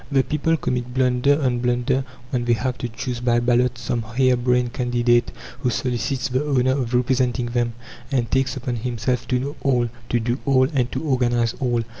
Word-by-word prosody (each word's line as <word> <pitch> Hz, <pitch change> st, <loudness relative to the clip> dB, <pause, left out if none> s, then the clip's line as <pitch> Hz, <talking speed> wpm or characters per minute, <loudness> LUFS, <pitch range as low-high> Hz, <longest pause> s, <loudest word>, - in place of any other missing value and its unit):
The 135 Hz, -1 st, +4 dB
people 155 Hz, +3 st, 0 dB
commit 125 Hz, -3 st, -3 dB
blunder 130 Hz, +2 st, +3 dB
on 125 Hz, -2 st, +1 dB
blunder 125 Hz, +2 st, +1 dB, 0.3 s
when 120 Hz, -2 st, -1 dB
they 120 Hz, -, +3 dB
have 125 Hz, +2 st, -1 dB
to 120 Hz, -, -3 dB
choose 120 Hz, +1 st, -4 dB
by 120 Hz, -1 st, +2 dB
ballot 120 Hz, +1 st, +2 dB
some 120 Hz, -1 st, -2 dB
hare 125 Hz, +3 st, +2 dB
brained 125 Hz, 0 st, +1 dB
candidate 120 Hz, -1 st, +2 dB, 0.3 s
who 125 Hz, -1 st, 0 dB
solicits 125 Hz, +1 st, -1 dB
the 130 Hz, +2 st, 0 dB
honour 130 Hz, -3 st, +2 dB
of 130 Hz, -3 st, -1 dB
representing 125 Hz, 0 st, +1 dB
them, 120 Hz, -1 st, -1 dB, 0.4 s
and 120 Hz, -4 st, 0 dB
takes 135 Hz, 0 st, +1 dB
upon 125 Hz, -2 st, -3 dB
himself 120 Hz, +1 st, -2 dB
to 125 Hz, -, +1 dB
know 140 Hz, +3 st, -3 dB
all, 125 Hz, -4 st, +2 dB, 0.2 s
to 120 Hz, -, +2 dB
do 120 Hz, +3 st, -1 dB
all, 130 Hz, -2 st, +4 dB
and 125 Hz, -3 st, +1 dB
to -, -, -3 dB
organize 120 Hz, -5 st, +1 dB
all. 120 Hz, -3 st, 0 dB
125 Hz, 190 wpm, -22 LUFS, 120-130 Hz, 0.4 s, The